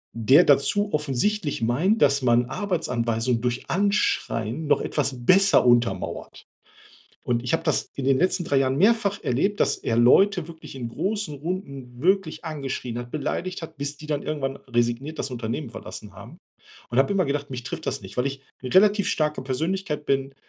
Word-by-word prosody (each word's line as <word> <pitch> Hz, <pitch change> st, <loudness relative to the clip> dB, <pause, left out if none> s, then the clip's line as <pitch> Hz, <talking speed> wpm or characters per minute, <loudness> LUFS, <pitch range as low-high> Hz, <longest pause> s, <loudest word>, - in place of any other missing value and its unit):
der 130 Hz, +9 st, +5 dB
dazu 200 Hz, +9 st, +2 dB
offensichtlich 150 Hz, -, -1 dB
meint, 160 Hz, -, +1 dB
dass 140 Hz, -1 st, +3 dB
man 120 Hz, 0 st, +3 dB
Arbeitsanweisungen 120 Hz, -, -1 dB
durch 125 Hz, 0 st, -3 dB
Anschreien 160 Hz, -, 0 dB
noch -, -, +3 dB
etwas 130 Hz, -4 st, -2 dB
besser 195 Hz, +2 st, +5 dB
untermauert. 120 Hz, -6 st, 0 dB, 0.8 s
Und 120 Hz, -1 st, 0 dB
ich 125 Hz, +5 st, -1 dB
habe 165 Hz, 0 st, -1 dB
das 155 Hz, -, 0 dB
in 135 Hz, -, -4 dB
den 135 Hz, 0 st, +3 dB
letzten 180 Hz, 0 st, +1 dB
3 140 Hz, -3 st, +2 dB
Jahren 130 Hz, 0 st, +1 dB
mehrfach 205 Hz, +2 st, +2 dB
erlebt, 195 Hz, +12 st, 0 dB
dass -, -, +2 dB
er 115 Hz, -, -1 dB
Leute 180 Hz, +9 st, +4 dB
wirklich 165 Hz, -4 st, -11 dB
in 125 Hz, -3 st, -4 dB
großen 200 Hz, -, -2 dB
Runden 140 Hz, -6 st, -6 dB
wirklich 180 Hz, -2 st, +1 dB
angeschrien 135 Hz, -6 st, -4 dB
hat, 120 Hz, 0 st, -7 dB
beleidigt 165 Hz, +5 st, -3 dB
hat, 165 Hz, -, -9 dB
bis 145 Hz, +1 st, -4 dB
die 150 Hz, -, -11 dB
dann 145 Hz, -2 st, -2 dB
irgendwann 135 Hz, -3 st, -3 dB
resigniert 120 Hz, +5 st, -2 dB
das 135 Hz, -, -3 dB
Unternehmen 120 Hz, +2 st, -4 dB
verlassen -, -, -9 dB
haben. -, -, -12 dB, 0.5 s
Und 120 Hz, -, -2 dB
habe 135 Hz, +8 st, +3 dB
immer 190 Hz, -3 st, +2 dB
gedacht, 140 Hz, 0 st, -3 dB
mich 125 Hz, -2 st, -6 dB
trifft -, -, -6 dB
das -, -, -2 dB
nicht, 95 Hz, -2 st, -11 dB
weil 125 Hz, +2 st, +1 dB
ich 135 Hz, 0 st, -8 dB, 0.2 s
'ne 125 Hz, -, -5 dB
relativ 205 Hz, +1 st, +4 dB
starke 150 Hz, -3 st, 0 dB
Persönlichkeit 150 Hz, +4 st, -2 dB
bin, 135 Hz, 0 st, 0 dB
140 Hz, 175 wpm, -24 LUFS, 125-180 Hz, 0.8 s, der